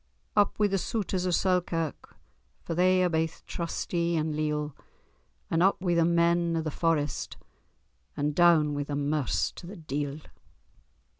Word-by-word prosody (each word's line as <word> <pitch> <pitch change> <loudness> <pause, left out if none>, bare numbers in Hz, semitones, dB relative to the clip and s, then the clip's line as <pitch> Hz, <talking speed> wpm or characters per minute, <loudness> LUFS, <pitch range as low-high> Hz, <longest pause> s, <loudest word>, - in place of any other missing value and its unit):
Up 205 -1 +3
wi' 210 - +3
the 195 -1 +1
Souters 190 -3 -2
of 180 - +2
Selkirk, 175 -5 -1 0.5
For - - -4
they 185 +2 +3
are - - +4
baith 160 -1 -2
trusty 170 0 -2
and 155 -1 -1
leal; 150 -1 -2 0.8
And 165 - +2
up 195 +2 +3
wi' 180 -1 0
the 170 -1 +3
men 170 0 +2
o' - - 0
the 155 - -3
Forest, 155 -3 -1 0.8
And 145 0 0
doun 160 -3 +4
wi' 145 - -2
the 145 0 -3
Merse 145 -1 0
to 170 - -11
the 195 - -8
deil. 145 -1 -4
165 Hz, 155 wpm, -28 LUFS, 150-175 Hz, 0.8 s, are